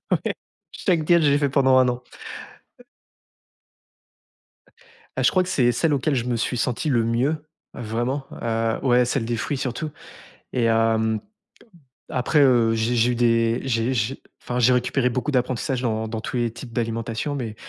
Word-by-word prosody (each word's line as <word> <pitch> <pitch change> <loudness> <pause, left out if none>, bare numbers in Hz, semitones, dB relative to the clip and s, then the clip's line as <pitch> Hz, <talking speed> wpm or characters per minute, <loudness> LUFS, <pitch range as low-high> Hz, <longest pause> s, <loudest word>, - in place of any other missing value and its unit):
Ouais. - - 0 0.4
Chaque 170 -6 0
diète, 170 +1 +4
je 145 - +4
l'ai 140 - +3
fait 145 -1 +1
pendant 130 -1 +4
1 130 - +4
an. 125 0 -2 0.8
He - - -17 2.3
Bah, 130 - 0
je 130 - +5
crois 185 - +3
que 180 - -5
c'est 120 -2 +3
celle 155 +6 +1
auquel 140 +2 +1
je 120 -3 0
me 125 -1 -1
suis 120 +2 -1
senti 120 +5 -1
le 120 -5 +2
mieux. 120 +7 +1 0.4
Vraiment, 120 +4 -3 0.2
heu, 115 -1 0
ouais, 125 -2 +4
celle 120 -1 -1
des 120 0 -1
fruits, 140 +5 -2
surtout. 130 +5 -3 0.6
Et 125 - +1
hem, 110 -1 +2 0.9
après, 130 +4 +1
heu, 120 -5 +4
j'ai 115 +2 0
j'ai 120 +1 +3
eu - - -1
des 115 -1 +2
j'ai 120 -1 0
j'ai 120 +3 -1 0.2
enfin, 125 - -3
j'ai 125 +1 +5
récupéré 125 +1 +1
beaucoup 125 +4 -2
d'apprentissage 130 0 -1
dans 110 -2 -1
dans 110 0 -4
tous 120 - -5
les 120 -1 0
types 120 0 -10
d'alimentation. 115 +4 -2
Mais, 115 -5 -4
125 Hz, 175 wpm, -23 LUFS, 115-130 Hz, 2.3 s, je